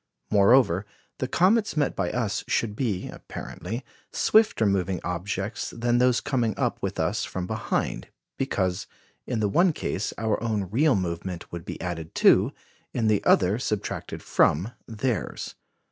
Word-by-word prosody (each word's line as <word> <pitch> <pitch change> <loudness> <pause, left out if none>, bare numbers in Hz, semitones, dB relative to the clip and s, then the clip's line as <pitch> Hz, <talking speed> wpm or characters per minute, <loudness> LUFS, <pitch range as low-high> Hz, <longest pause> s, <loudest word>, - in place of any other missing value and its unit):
Moreover, 105 -2 +4 0.3
the - - -1
comets 205 0 +2
met 145 -2 +1
by 90 -3 0
us 110 -3 -1
should 105 -3 0
be, 105 -7 -1
apparently, 115 +8 -7 0.3
swifter 215 - +3
moving 95 -2 +1
objects 95 +5 -3
than 120 +1 +2
those 125 -1 +3
coming 120 -6 0
up - - -1
with - - -3
us - - 0
from 90 -1 -4
behind; 110 +3 -2 0.3
because, 95 -9 -1 0.4
in 120 -4 -1
the 105 - +2
one 175 - +3
case, 105 - -2
our 110 -2 0
own 110 -4 -1
real 145 +5 +4
movement 90 -1 -4
would 85 -1 -6
be - - -6
added 80 -3 -5
to, - - +5 0.4
in 115 -3 +2
the 105 -2 +2
other 95 +4 +4
subtracted 105 -4 -3
from, 90 +10 +2 0.2
theirs. 115 -2 -3
105 Hz, 145 wpm, -26 LUFS, 95-120 Hz, 0.4 s, to